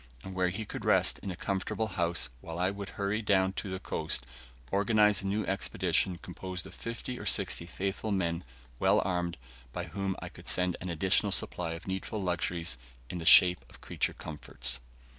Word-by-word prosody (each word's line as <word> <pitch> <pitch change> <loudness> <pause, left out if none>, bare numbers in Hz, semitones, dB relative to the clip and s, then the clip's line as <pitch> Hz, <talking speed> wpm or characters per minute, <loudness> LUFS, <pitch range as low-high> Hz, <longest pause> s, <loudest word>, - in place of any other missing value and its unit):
and 95 - -7
where 90 -1 +2
he 100 +5 -4
could - - -6
rest - - +4
in - - -5
a 90 - -3
comfortable 100 +4 -1
house, 85 -5 +1
while 80 +5 -7
I 90 +2 +2
would 100 -1 -6
hurry 100 +2 0
down 95 -2 +3
to 95 - -4
the 95 0 -3
coast, 60 -8 -2 0.5
organise 105 -1 +4
a 100 - -3
new 105 +1 0
expedition 95 -1 +1
composed 90 +1 -6
of - - -10
fifty 115 +2 -5
or - - -7
sixty 85 - +1
faithful 100 +4 -2
men, 85 -3 0 0.4
well - - +5
armed, 90 -2 -1 0.3
by - - -3
whom 95 -1 -2
I - - -6
could - - -12
send 90 -1 +3
an 90 - -4
additional 90 +3 +2
supply 85 -2 0
of 85 +1 -8
needful 95 +3 -2
luxuries 85 -6 -1 0.3
in 90 - -4
the 80 - -5
shape 90 +1 +8
of - - -12
creature - - 0
comforts. 65 -5 -5
95 Hz, 185 wpm, -31 LUFS, 85-100 Hz, 0.5 s, shape